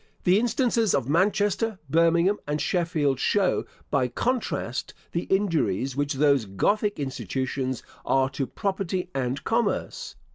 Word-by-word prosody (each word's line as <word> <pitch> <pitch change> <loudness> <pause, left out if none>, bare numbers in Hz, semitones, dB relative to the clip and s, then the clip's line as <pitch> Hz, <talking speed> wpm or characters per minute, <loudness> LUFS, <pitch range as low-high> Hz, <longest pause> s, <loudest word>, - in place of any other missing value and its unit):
The 185 +3 +4
instances 235 - +2
of 135 -3 -1
Manchester, 205 +6 +1
Birmingham, 170 +6 +3
and 150 +1 -1
Sheffield 155 -5 0
show, 195 +4 +2 0.3
by 135 -3 +2
contrast, 145 - -2 0.2
the 170 - -2
injuries 150 - 0
which 145 0 0
those 140 -4 +3
Gothic 205 - 0
institutions 130 -1 -3 0.2
are 135 0 +2
to 135 -1 -2
property 190 -3 -2
and 135 +1 -2
commerce. 230 +1 -1
165 Hz, 120 wpm, -26 LUFS, 135-200 Hz, 0.3 s, The